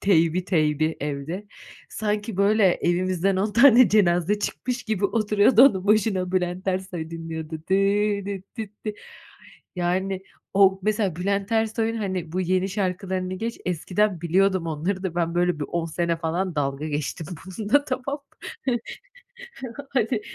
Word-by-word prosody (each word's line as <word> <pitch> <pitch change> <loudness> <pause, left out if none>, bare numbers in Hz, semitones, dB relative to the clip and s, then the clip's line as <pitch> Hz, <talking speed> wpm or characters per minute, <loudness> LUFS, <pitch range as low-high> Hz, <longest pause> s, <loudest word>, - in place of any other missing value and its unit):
teybi, 175 -2 +3
teybi 155 -3 +1
evde. 150 +8 -4 0.4
Sanki 210 -1 -2
böyle 205 +2 +3
evimizden 185 +2 0
10 205 +2 0
tane 250 0 +7
cenaze 190 -1 +3
çıkmış 250 +4 -3
gibi 215 -4 -2
oturuyordu 215 +2 +4
onun 195 -8 +4
başına 200 -3 +2
Bülent 185 +1 -1
Ersoy 185 -3 -3
dinliyordu. 165 -1 -6 0.2
Dıı 200 +1 +2
dit 195 +1 -7
dit 210 -2 -8
di. 215 -1 -3 0.8
Yani 185 +2 -1 0.3
o 195 -1 +5
mesela 205 -4 0
Bülent 200 +4 -1
Ersoy'un, 225 0 0
hani, 185 -6 -3
bu 185 - 0
yeni 185 +1 +1
şarkılarını 185 -1 -2
geç, 230 +5 -4
eskiden 180 +2 0
biliyordum 185 +1 +2
onları 170 +5 -2
da 185 -3 -3
ben 170 -1 -1
böyle 175 -3 +1
bir - - -1
10 170 -1 -1
sene 170 +1 -1
falan 170 +2 -2
dalga 140 0 -2
geçtim 150 +2 -3 0.2
bununla 215 +9 +1
tamam 265 +2 -3 0.5
mı? 250 -2 +2 1.1
Hani 235 -3 0
190 Hz, 140 wpm, -24 LUFS, 175-210 Hz, 1.1 s, tane